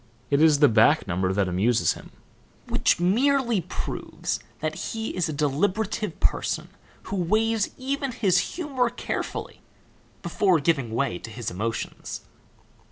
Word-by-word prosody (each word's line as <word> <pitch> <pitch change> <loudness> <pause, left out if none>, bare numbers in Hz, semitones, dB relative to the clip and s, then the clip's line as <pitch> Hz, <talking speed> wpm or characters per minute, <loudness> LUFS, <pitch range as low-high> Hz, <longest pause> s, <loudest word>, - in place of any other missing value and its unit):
It 140 +1 +4
is 155 -2 +6
the 145 0 +6
back 110 -3 +4
number 95 +1 0
that 95 0 +1
amuses 110 +6 +2
him - - -12 0.6
which - - +2
merely 235 +4 +2
proves 180 - -4 0.2
that - - -2
he 225 -1 -4
is 180 -3 0
a - - -1
deliberative 185 +9 -1
person - - 0 0.3
who - - -5
weighs 215 +4 +1
even 275 +1 -2
his 200 -7 +1
humor 270 -8 0
carefully 245 - -5 0.6
before 185 -5 +2
giving 140 -5 +1
way 120 -8 0
to - - -9
his 115 +1 -5
emotions." 110 +5 -4
175 Hz, 135 wpm, -25 LUFS, -, 0.6 s, is